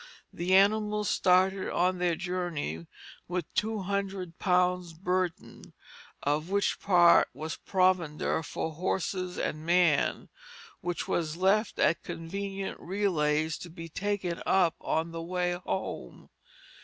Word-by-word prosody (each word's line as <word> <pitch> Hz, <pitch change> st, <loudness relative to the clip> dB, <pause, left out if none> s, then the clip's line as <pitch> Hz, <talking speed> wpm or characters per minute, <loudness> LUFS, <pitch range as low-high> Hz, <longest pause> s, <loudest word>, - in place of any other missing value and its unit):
The 180 Hz, +2 st, +1 dB
animals 210 Hz, +1 st, +3 dB
started 190 Hz, +1 st, +3 dB
on 180 Hz, +1 st, +1 dB
their 175 Hz, -2 st, +1 dB
journey 170 Hz, -, -3 dB, 0.4 s
with 175 Hz, -2 st, -4 dB
two 220 Hz, -1 st, 0 dB
hundred 190 Hz, -3 st, -3 dB
pounds' 180 Hz, -2 st, +1 dB
burden, 180 Hz, 0 st, -3 dB, 0.5 s
of 150 Hz, +4 st, 0 dB
which 200 Hz, +1 st, +1 dB
part 175 Hz, -3 st, +6 dB
was 155 Hz, +3 st, -5 dB
provender 185 Hz, -5 st, +1 dB
for 160 Hz, 0 st, -4 dB
horse 185 Hz, +3 st, -1 dB
and 180 Hz, -4 st, -3 dB
man, 170 Hz, -3 st, +2 dB, 0.5 s
which 175 Hz, 0 st, -3 dB
was 160 Hz, -1 st, -1 dB
left 195 Hz, +4 st, +2 dB
at 170 Hz, -, +2 dB
convenient 195 Hz, +4 st, -5 dB
relays 160 Hz, -5 st, 0 dB
to 175 Hz, -, -8 dB
be 165 Hz, 0 st, -9 dB
taken 190 Hz, -1 st, -2 dB
up 180 Hz, -4 st, +3 dB
on 160 Hz, +1 st, -1 dB
the 165 Hz, 0 st, -5 dB
way 180 Hz, +1 st, -1 dB
home. 180 Hz, +2 st, -5 dB
180 Hz, 120 wpm, -29 LUFS, 165-190 Hz, 0.5 s, part